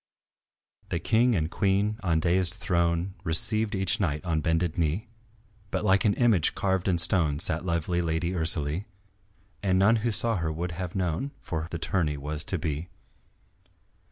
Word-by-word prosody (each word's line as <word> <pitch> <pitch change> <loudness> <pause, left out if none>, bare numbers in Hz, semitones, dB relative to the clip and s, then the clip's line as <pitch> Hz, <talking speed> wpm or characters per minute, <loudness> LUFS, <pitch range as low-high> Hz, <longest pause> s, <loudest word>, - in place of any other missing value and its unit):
The - - -1
King 115 +7 +2
and 80 -2 -1
Queen 100 +2 0
on 85 -4 +1
daïsed 90 +2 +3
throne 85 -1 -1
Received 105 +6 +4
each 95 +4 0
knight 75 -6 -2
on 80 -3 -1
bended 80 +1 0
knee; 85 +8 -2 0.6
But 105 - -3
like 95 0 +3
an 100 - +2
image 110 -10 +2
carved 95 -1 -1
in 90 -2 +2
stone 85 -4 +1
Sat 80 +2 +3
lovely 85 +1 -1
Lady 85 +1 -1
Ursalie 80 0 0 0.8
And 95 -2 +1
none 105 +5 +4
who 115 +2 -1
saw 115 0 +1
her 80 -2 -2
would 85 +3 -4
have 90 +1 -6
known 90 - -2
For 80 -2 -4
her 80 - -6
the 85 - -4
tourney 85 -3 -1
was 75 +2 -4
to 95 - -1
be. 80 +2 -4
85 Hz, 165 wpm, -26 LUFS, 80-100 Hz, 0.8 s, Received